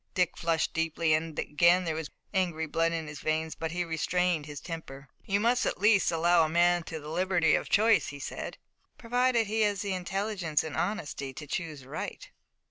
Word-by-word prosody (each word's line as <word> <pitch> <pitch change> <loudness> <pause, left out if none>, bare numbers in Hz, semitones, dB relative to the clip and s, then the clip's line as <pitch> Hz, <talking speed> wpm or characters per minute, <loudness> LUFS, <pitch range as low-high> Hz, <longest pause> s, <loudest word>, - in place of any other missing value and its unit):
Dick 180 -2 +1
flushed 165 -1 0
deeply, 165 0 +1
and 155 0 -1
again 170 +4 +3
there 165 -2 -1
was 160 -1 -4 0.2
angry 175 -4 0
blood 165 +2 +1
in 165 -1 -2
his 150 -1 -8
veins, 160 +1 -1
but 160 - -4
he 175 +1 -1
restrained 170 -1 0
his 145 -2 -7
temper. 145 -5 -8 0.2
"You 200 0 +2
must 240 +3 +2
at - - -1
least 200 -3 +4
allow 170 +2 +3
to 160 - +5
a - - -2
man 175 +1 +3
the 155 -2 -6
liberty 175 0 +2
of - - 0
choice," 220 +1 +4
he 140 - -6
said. 140 - -6 0.4
"Provided 245 0 +2
he 220 +2 -1
has 205 -2 +1
the 200 -1 -2
intelligence 185 -3 -1
and 160 - -6
honesty 145 -8 -3
to 150 +3 -8
choose 155 -3 -5
right." 135 - -6
170 Hz, 195 wpm, -29 LUFS, 155-190 Hz, 0.4 s, to